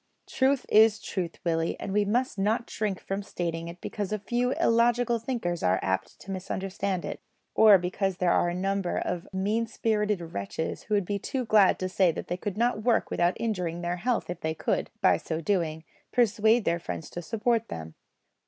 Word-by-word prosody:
Truth 265 Hz, 0 st, +1 dB
is 220 Hz, 0 st, +5 dB
truth, 175 Hz, -4 st, -4 dB
Willie, 165 Hz, -1 st, 0 dB
and 195 Hz, -, -4 dB
we 205 Hz, 0 st, +3 dB
must 235 Hz, +1 st, 0 dB
not 220 Hz, +4 st, +1 dB
shrink 205 Hz, -3 st, -2 dB
from 195 Hz, +1 st, -4 dB
stating 170 Hz, -4 st, -4 dB
it 170 Hz, +1 st, -9 dB
because 205 Hz, -2 st, -4 dB
a 215 Hz, -, 0 dB
few 240 Hz, +4 st, -1 dB
illogical 235 Hz, 0 st, +2 dB
thinkers 220 Hz, -8 st, -2 dB
are 90 Hz, +1 st, +3 dB
apt 95 Hz, 0 st, -2 dB
to 195 Hz, -, -8 dB
misunderstand 190 Hz, 0 st, -3 dB
it, -, -, -6 dB, 0.3 s
or 215 Hz, -2 st, +8 dB
because 185 Hz, +1 st, -2 dB
there 180 Hz, -2 st, +2 dB
are 175 Hz, -, +3 dB
a 175 Hz, -, -3 dB
number 195 Hz, 0 st, -1 dB
of 180 Hz, +2 st, -3 dB
mean 210 Hz, +5 st, 0 dB
spirited 210 Hz, -3 st, 0 dB
wretches 100 Hz, +11 st, -4 dB
who 210 Hz, -, 0 dB
would 200 Hz, -3 st, +1 dB
be 200 Hz, +2 st, -2 dB
too 255 Hz, +5 st, -3 dB
glad 210 Hz, -3 st, +5 dB
to 185 Hz, -, -2 dB
say 185 Hz, -1 st, +3 dB
that -, -, -7 dB
they 175 Hz, -, -1 dB
could 200 Hz, +1 st, -4 dB
not 235 Hz, -2 st, +1 dB
work 230 Hz, 0 st, +1 dB
without 175 Hz, +1 st, +1 dB
injuring 180 Hz, -7 st, -2 dB
their 175 Hz, +1 st, -2 dB
health 240 Hz, +5 st, -1 dB
if 175 Hz, -, -6 dB
they 160 Hz, 0 st, -2 dB
could, -, -, -1 dB
by 190 Hz, -, +5 dB
so 160 Hz, -1 st, -4 dB
doing, 165 Hz, -3 st, -1 dB, 0.3 s
persuade 225 Hz, -1 st, +3 dB
their 170 Hz, +1 st, +1 dB
friends 90 Hz, -, -6 dB
to 175 Hz, -, -5 dB
support 225 Hz, +4 st, 0 dB
them. 80 Hz, -1 st, -7 dB
195 Hz, 195 wpm, -27 LUFS, 175-220 Hz, 0.3 s, or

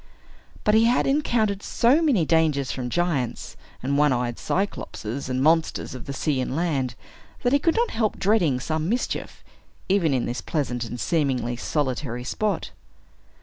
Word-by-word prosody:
But 210 Hz, -, +3 dB
he 220 Hz, +1 st, +5 dB
had 240 Hz, +2 st, +3 dB
encountered 235 Hz, -8 st, +1 dB
so 255 Hz, +10 st, +3 dB
many 255 Hz, -, +3 dB
dangers 155 Hz, -4 st, +2 dB
from 125 Hz, -2 st, -4 dB
giants, 160 Hz, -7 st, -1 dB, 0.3 s
and 140 Hz, +2 st, +1 dB
one 150 Hz, -1 st, +4 dB
eyed 120 Hz, -2 st, -1 dB
Cyclops, 195 Hz, -, -3 dB
and 130 Hz, +3 st, -2 dB
monsters 160 Hz, -1 st, +2 dB
of 130 Hz, -2 st, -9 dB
the -, -, -3 dB
sea 140 Hz, -1 st, 0 dB
and 130 Hz, -, -3 dB
land, 140 Hz, -7 st, -1 dB, 0.5 s
that 245 Hz, +1 st, +2 dB
he 285 Hz, -, +5 dB
could 330 Hz, +3 st, +2 dB
not 470 Hz, +1 st, +1 dB
help 220 Hz, -2 st, 0 dB
dreading 180 Hz, -, +2 dB
some 155 Hz, +4 st, -2 dB
mischief, 245 Hz, +3 st, -3 dB, 0.5 s
even 185 Hz, -5 st, +3 dB
in 130 Hz, -3 st, +1 dB
this 120 Hz, -2 st, -3 dB
pleasant 125 Hz, -3 st, -2 dB
and 120 Hz, +1 st, -6 dB
seemingly 130 Hz, -7 st, 0 dB
solitary 130 Hz, -2 st, -2 dB
spot. 210 Hz, +10 st, -2 dB
155 Hz, 160 wpm, -24 LUFS, 130-205 Hz, 0.5 s, he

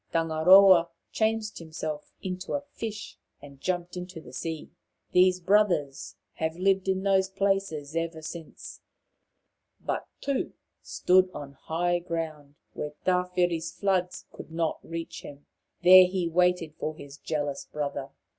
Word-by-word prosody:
Tangaroa 170 Hz, +2 st, +6 dB, 0.2 s
changed 220 Hz, -1 st, -1 dB
himself 155 Hz, -2 st, -6 dB
into 185 Hz, 0 st, -4 dB
a 285 Hz, -, 0 dB
fish 215 Hz, -2 st, -6 dB, 0.2 s
and 140 Hz, -1 st, -14 dB
jumped 175 Hz, -1 st, -2 dB
into 180 Hz, -1 st, -7 dB
the -, -, -13 dB
sea. 160 Hz, -2 st, -5 dB, 0.4 s
These 185 Hz, 0 st, +4 dB
brothers 180 Hz, -7 st, +1 dB, 0.2 s
have 160 Hz, +1 st, -2 dB
lived 195 Hz, +1 st, +2 dB
in 190 Hz, 0 st, 0 dB
those 190 Hz, -1 st, +3 dB
places 195 Hz, -6 st, -1 dB
ever 165 Hz, -1 st, -3 dB
since. 165 Hz, 0 st, -9 dB, 1.0 s
But -, -, -3 dB
Tu 280 Hz, -2 st, -2 dB, 0.3 s
stood 185 Hz, +1 st, +3 dB
on 140 Hz, -1 st, -7 dB
high 175 Hz, +4 st, -1 dB
land, 155 Hz, -4 st, -4 dB, 0.2 s
where 150 Hz, 0 st, -5 dB
Tawhiri' 180 Hz, -1 st, +1 dB
s 160 Hz, 0 st, -6 dB
floods 185 Hz, -3 st, -1 dB
could -, -, -10 dB
not 165 Hz, -1 st, -1 dB
reach 165 Hz, 0 st, -6 dB
him. 145 Hz, 0 st, -11 dB, 0.4 s
There 185 Hz, +1 st, +9 dB
he 180 Hz, -1 st, -1 dB
waited 180 Hz, -2 st, +2 dB
for 155 Hz, -, -3 dB
his 140 Hz, -1 st, -11 dB
jealous 145 Hz, -2 st, -3 dB
brother. 140 Hz, -2 st, -3 dB
175 Hz, 135 wpm, -27 LUFS, 155-185 Hz, 1.0 s, There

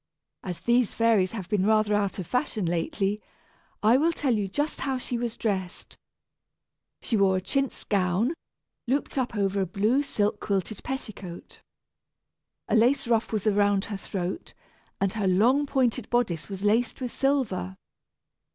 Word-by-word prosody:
As 180 Hz, -3 st, -6 dB
these 240 Hz, -1 st, +2 dB
fairies 225 Hz, -5 st, +3 dB
have 195 Hz, -6 st, -5 dB
been 205 Hz, -3 st, +1 dB
rather 215 Hz, 0 st, +3 dB
out 205 Hz, -2 st, 0 dB
of 185 Hz, -, -4 dB
fashion 235 Hz, -, -1 dB
lately, 195 Hz, +5 st, -1 dB, 0.6 s
I 225 Hz, +4 st, +6 dB
will 320 Hz, +4 st, +3 dB
tell 285 Hz, -6 st, 0 dB
you 205 Hz, -2 st, -1 dB
just 290 Hz, +10 st, -2 dB
how 265 Hz, -1 st, -1 dB
she 250 Hz, 0 st, -4 dB
was 235 Hz, -1 st, -3 dB
dressed. 190 Hz, -5 st, -3 dB, 1.1 s
She 230 Hz, -, 0 dB
wore 195 Hz, -2 st, +3 dB
a -, -, -2 dB
chintz 275 Hz, +7 st, -1 dB
gown, 195 Hz, -, +1 dB, 0.5 s
looped 275 Hz, +4 st, -1 dB
up 245 Hz, -2 st, -2 dB
over 200 Hz, -1 st, +1 dB
a 190 Hz, -, 0 dB
blue 215 Hz, +9 st, +2 dB
silk 210 Hz, -7 st, -1 dB
quilted 200 Hz, +1 st, -2 dB
petticoat. 205 Hz, -9 st, -7 dB, 1.1 s
A 230 Hz, -, +1 dB
lace 250 Hz, +4 st, +3 dB
ruff 230 Hz, -1 st, +1 dB
was 215 Hz, -2 st, -1 dB
around 205 Hz, -2 st, +3 dB
her 205 Hz, -2 st, -5 dB
throat, 190 Hz, -, -5 dB, 0.4 s
and 195 Hz, -1 st, +1 dB
her 210 Hz, -3 st, -1 dB
long 245 Hz, +10 st, +3 dB
pointed 255 Hz, -2 st, 0 dB
bodice 210 Hz, -10 st, 0 dB
was 195 Hz, 0 st, -6 dB
laced 225 Hz, +3 st, +2 dB
with 250 Hz, -2 st, -4 dB
silver. 255 Hz, -10 st, 0 dB
215 Hz, 155 wpm, -27 LUFS, 195-245 Hz, 1.1 s, I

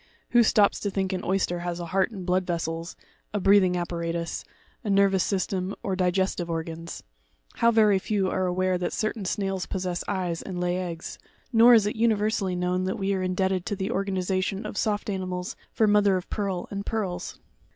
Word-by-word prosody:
Who 240 Hz, -, +6 dB
stops 210 Hz, -2 st, +4 dB
to 205 Hz, -, -2 dB
think 190 Hz, -1 st, -1 dB
an 185 Hz, -, -3 dB
oyster 180 Hz, -2 st, 0 dB
has 175 Hz, 0 st, -3 dB
a 175 Hz, -, -4 dB
heart 190 Hz, +4 st, +1 dB
and 195 Hz, -6 st, -8 dB
blood 185 Hz, 0 st, +1 dB
vessels, 165 Hz, -1 st, -3 dB, 0.4 s
a -, -, +2 dB
breathing 190 Hz, -2 st, +4 dB
apparatus, 170 Hz, -1 st, -3 dB, 0.4 s
a 215 Hz, -, -3 dB
nervous 195 Hz, -1 st, +4 dB
system, 190 Hz, -1 st, -1 dB
or 195 Hz, -, -1 dB
digestive 185 Hz, -1 st, 0 dB
organs? 165 Hz, 0 st, -5 dB, 0.5 s
How 235 Hz, -, +4 dB
very 215 Hz, -4 st, +4 dB
few 195 Hz, -1 st, 0 dB
are 185 Hz, 0 st, 0 dB
aware 185 Hz, 0 st, +1 dB
that 180 Hz, -, -2 dB
certain 215 Hz, -2 st, -2 dB
snails 195 Hz, -1 st, -2 dB
possess 180 Hz, -2 st, -2 dB
eyes 180 Hz, -4 st, -2 dB
and 185 Hz, -2 st, -5 dB
lay 180 Hz, 0 st, 0 dB
eggs; 170 Hz, -2 st, -5 dB, 0.3 s
nor 235 Hz, +2 st, +8 dB
is 220 Hz, -3 st, +4 dB
it 210 Hz, -, -1 dB
universally 215 Hz, -4 st, +1 dB
known 180 Hz, +1 st, 0 dB
that 190 Hz, -, -2 dB
we 195 Hz, 0 st, 0 dB
are 190 Hz, -, -1 dB
in 185 Hz, 0 st, -1 dB
debted 190 Hz, -1 st, +1 dB
to 205 Hz, -, -2 dB
the 190 Hz, 0 st, -3 dB
organization 190 Hz, 0 st, -1 dB
of -, -, -5 dB
soft 210 Hz, 0 st, -1 dB
animals 185 Hz, -2 st, -3 dB, 0.2 s
for 220 Hz, -, +2 dB
mother 205 Hz, -2 st, +4 dB
of 180 Hz, -, -7 dB
pearl 195 Hz, -4 st, -2 dB
and 200 Hz, 0 st, -3 dB
pearls! 190 Hz, -5 st, -3 dB
190 Hz, 190 wpm, -26 LUFS, 180-200 Hz, 0.5 s, nor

